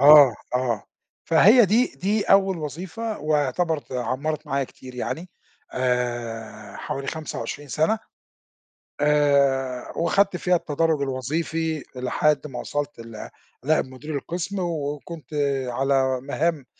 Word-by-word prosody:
آه، 145 Hz, -4 st, +9 dB, 0.2 s
آه 125 Hz, -4 st, 0 dB, 0.4 s
فهي 210 Hz, +9 st, +7 dB
دي 225 Hz, +6 st, +4 dB
دي 205 Hz, +3 st, +1 dB
أول 195 Hz, -2 st, +4 dB
وظيفة 180 Hz, -, -5 dB
واعتبرِت 150 Hz, +1 st, 0 dB
عمَّرِت 135 Hz, +5 st, -2 dB
معايا 140 Hz, -1 st, 0 dB
كتير 130 Hz, 0 st, -13 dB
يعني 165 Hz, +8 st, -4 dB, 0.4 s
آآ 120 Hz, -4 st, -2 dB
حوالي 135 Hz, 0 st, -4 dB
25 150 Hz, -2 st, -5 dB
سَنة، 160 Hz, -, +1 dB, 1.0 s
آآ 140 Hz, -4 st, +2 dB
وخدت 195 Hz, +3 st, +2 dB
فيها 180 Hz, 0 st, +2 dB
التدرُّج 160 Hz, -1 st, 0 dB
الوظيفي 155 Hz, +4 st, -2 dB
لحد 150 Hz, +4 st, +1 dB
ما 130 Hz, -4 st, -7 dB
وصَلت 145 Hz, -3 st, -3 dB
ل 115 Hz, -2 st, -8 dB, 0.3 s
لنائب 155 Hz, +3 st, +3 dB
مدير 130 Hz, +4 st, -8 dB
القِسم 175 Hz, +7 st, -3 dB
و 160 Hz, -5 st, -1 dB
وكنت 155 Hz, +1 st, -10 dB, 0.4 s
على 130 Hz, 0 st, +1 dB
مَهام 145 Hz, +1 st, -1 dB
145 Hz, 115 wpm, -24 LUFS, 130-165 Hz, 1.0 s, آه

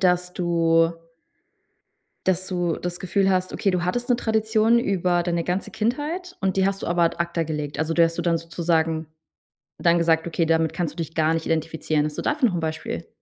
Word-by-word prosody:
dass 180 Hz, -1 st, +2 dB
du 165 Hz, -1 st, +2 dB, 1.4 s
dass 185 Hz, 0 st, +1 dB
du 175 Hz, -3 st, -1 dB
das 175 Hz, 0 st, -5 dB
Gefühl 195 Hz, +1 st, +1 dB
hast, 185 Hz, -1 st, 0 dB
okay, 195 Hz, -, +1 dB
du 180 Hz, -1 st, -1 dB
hattest 245 Hz, +7 st, -2 dB
'ne 245 Hz, -, +4 dB
Tradition 220 Hz, 0 st, +2 dB
über 180 Hz, -5 st, +1 dB
deine 170 Hz, -1 st, -1 dB
ganze 180 Hz, +2 st, -2 dB
Kindheit 295 Hz, -, -2 dB
und 190 Hz, -1 st, 0 dB
die 190 Hz, -, +4 dB
hast 195 Hz, 0 st, -2 dB
du -, -, -4 dB
aber 175 Hz, 0 st, +2 dB
ad 165 Hz, -, +1 dB
acta 170 Hz, -1 st, 0 dB
gelegt? 150 Hz, -2 st, -4 dB
Also, 160 Hz, +1 st, 0 dB
die 170 Hz, -, +5 dB
hast 165 Hz, 0 st, 0 dB
dir -, -, 0 dB
dann 170 Hz, -1 st, +2 dB
sozusagen 165 Hz, -1 st, -1 dB, 0.7 s
dann 170 Hz, 0 st, +3 dB
gesagt, 165 Hz, -1 st, +2 dB
okay, 165 Hz, 0 st, 0 dB
damit 160 Hz, 0 st, +1 dB
kannst 165 Hz, -3 st, -2 dB
du -, -, -24 dB
dich 165 Hz, -1 st, -4 dB
gar 160 Hz, 0 st, +2 dB
nicht 165 Hz, -, -3 dB
identifizieren? 160 Hz, -1 st, 0 dB
Hast 150 Hz, 0 st, -4 dB
du -, -, -1 dB
dafür 295 Hz, -5 st, +2 dB
noch -, -, -5 dB
'n 170 Hz, -, -1 dB
Beispiel? 160 Hz, 0 st, -4 dB
175 Hz, 210 wpm, -24 LUFS, 165-190 Hz, 1.4 s, die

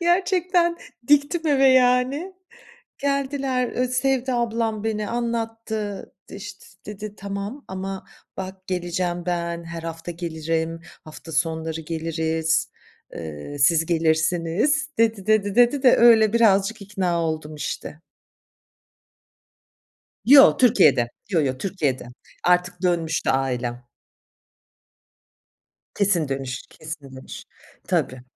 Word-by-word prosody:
gerçekten 350 Hz, -1 st, +2 dB, 0.3 s
diktim 295 Hz, +4 st, +3 dB
eve 275 Hz, -3 st, +4 dB
yani. 260 Hz, +7 st, +3 dB, 0.6 s
Geldiler, 275 Hz, -2 st, -1 dB
eee, 255 Hz, 0 st, 0 dB
sevdi 260 Hz, 0 st, 0 dB
ablam 225 Hz, -3 st, -1 dB
beni, 215 Hz, -1 st, -2 dB
anlattı, 225 Hz, -3 st, -4 dB, 0.2 s
işte, -, -, -9 dB, 0.2 s
dedi 210 Hz, 0 st, -7 dB
"Tamam, 200 Hz, +7 st, -6 dB
ama 190 Hz, 0 st, -5 dB, 0.3 s
bak 190 Hz, 0 st, -7 dB
geleceğim 175 Hz, -1 st, -2 dB
ben, 170 Hz, -1 st, -2 dB
her 165 Hz, 0 st, -7 dB
hafta 165 Hz, +1 st, -6 dB
gelirim, 165 Hz, -1 st, -3 dB, 0.2 s
hafta 155 Hz, +1 st, -11 dB
sonları 160 Hz, 0 st, -1 dB
geliriz, 160 Hz, 0 st, -1 dB, 0.5 s
ııı, 80 Hz, -, -7 dB
siz 160 Hz, +4 st, +3 dB
gelirsiniz." 170 Hz, -, +1 dB
dedi, 225 Hz, -4 st, +1 dB
dedi, 210 Hz, -2 st, +2 dB
dedi 245 Hz, +4 st, +4 dB
de 255 Hz, -, +6 dB
öyle 225 Hz, -3 st, +6 dB
birazcık 215 Hz, -2 st, +3 dB
ikna 185 Hz, -4 st, -1 dB
oldum 155 Hz, -1 st, -3 dB
işte. 150 Hz, 0 st, -6 dB, 2.2 s
Yo, 275 Hz, +2 st, +8 dB
Türkiye'de. 180 Hz, -, +4 dB, 0.2 s
Yo, 170 Hz, -, +2 dB
yo, 130 Hz, -3 st, -1 dB
Türkiye'de. 145 Hz, -7 st, -2 dB, 0.4 s
Artık 180 Hz, 0 st, +1 dB
dönmüştü 170 Hz, -3 st, 0 dB
ailem. 125 Hz, -2 st, -2 dB, 2.1 s
Kesin 190 Hz, -7 st, +1 dB
dönüş, 135 Hz, -1 st, -4 dB
kesin 150 Hz, -4 st, -9 dB
dönüş. 130 Hz, -, -9 dB, 0.5 s
Tabii. 130 Hz, -1 st, -1 dB
190 Hz, 100 wpm, -23 LUFS, 160-240 Hz, 2.2 s, Yo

